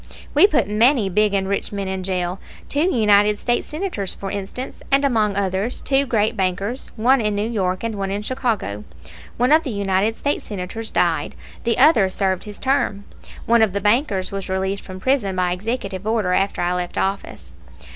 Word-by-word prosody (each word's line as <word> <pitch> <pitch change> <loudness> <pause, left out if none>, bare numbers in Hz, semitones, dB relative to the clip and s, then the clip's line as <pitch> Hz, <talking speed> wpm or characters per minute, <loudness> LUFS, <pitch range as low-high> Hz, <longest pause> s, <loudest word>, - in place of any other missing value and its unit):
We 310 +7 +7
put 255 - +1
many 220 +1 +3
big 210 +2 +2
and 190 -1 0
rich 200 0 -2
men 200 -1 -3
in 190 0 -3
jail; 185 0 -2 0.3
two 300 +6 +1
United 210 -3 +4
States 240 +2 -1
Senators, 305 - -3
for 195 -1 -6
instance, 205 +6 -6
and 275 +1 +4
among 215 -6 +1
others 195 +4 -1
two 275 0 +1
great 220 -3 +1
bankers, 195 +6 -2
one 245 +3 +3
in 210 -1 0
New 205 +2 -1
York 185 -5 -1
and 230 -1 -2
one 195 -2 -3
in 200 +2 -3
Chicago. 215 - -2 0.5
One 250 +3 +2
of 315 +1 +6
the 295 - -5
United 200 0 0
States 285 - -2
Senators 205 +3 -5
died, - - 0 0.3
the 230 - +1
other 220 -12 +5
served 190 -1 -1
his 210 -1 -8
term. 265 -7 0 0.4
(One 235 0 +4
of 215 -4 +3
the 200 - 0
bankers 205 -2 +1
was 195 -1 -5
released 190 +1 -1
from 185 -1 -9
prison 220 -5 0
by 180 -1 +1
executive 195 0 -4
order 215 -5 +1
after 195 -1 0
I 175 +1 +1
left 180 -1 -3
office.) 195 +1 -3
205 Hz, 185 wpm, -21 LUFS, 190-235 Hz, 0.5 s, We